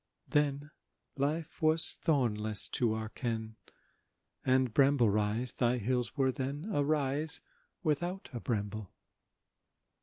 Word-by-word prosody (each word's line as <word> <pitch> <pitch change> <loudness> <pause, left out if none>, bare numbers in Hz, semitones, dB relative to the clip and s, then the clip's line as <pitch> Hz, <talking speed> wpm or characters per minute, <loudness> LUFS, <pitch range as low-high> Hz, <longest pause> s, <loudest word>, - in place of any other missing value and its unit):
Then 145 0 0 0.4
life 150 +3 -3
was 155 0 +6
thornless 110 -8 +2
to 115 -3 0
our 110 0 -4
ken, 110 -2 -4 0.9
And, 130 -2 +2
Bramble 135 -4 +4
Rise, 110 +4 -1
thy 125 0 +1
hills 125 +2 -2
were 135 -1 +2
then 140 +5 -4
A 145 - +2
rise 150 +1 0 0.4
without 175 +4 -2
a 120 - -4
bramble. 105 -3 -3
130 Hz, 115 wpm, -31 LUFS, 110-145 Hz, 0.9 s, was